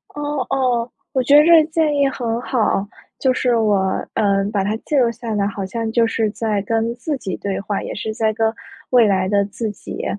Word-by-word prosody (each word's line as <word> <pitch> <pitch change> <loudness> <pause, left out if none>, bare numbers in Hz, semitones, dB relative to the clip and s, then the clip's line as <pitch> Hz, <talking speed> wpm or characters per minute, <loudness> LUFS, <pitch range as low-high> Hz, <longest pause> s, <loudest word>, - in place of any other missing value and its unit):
哦 290 -2 -2
哦， 250 -3 0 0.2
我 260 - +2
觉 285 +3 +5
得 300 - +7
这 335 -1 +7
建 315 -1 0
议 280 -1 +3
很 235 -3 -3
好。 215 -5 0 0.3
就 260 -1 +2
是 245 -2 +1
我， 215 -2 +2 0.4
呃， 200 -2 +2
把 200 -2 +1
它 210 +3 -1
记 300 - -2
录 245 -4 +3
下 230 -1 -6
来 200 - +1
好 200 -1 -3
像 225 +3 -3
就 230 0 +3
是 225 -1 0
在 215 -2 -1
跟 225 +2 -1
自 295 +3 -3
己 190 -8 -5
对 200 -1 -3
话， 200 0 -3
也 - - -5
是 220 +1 -4
在 220 -1 +1
跟 220 0 +1 0.4
未 245 -3 +6
来 190 -2 +1
的 200 +1 +2
自 205 +3 -4
己 205 - -7
225 Hz, 230 characters per minute, -20 LUFS, 205-255 Hz, 0.4 s, 得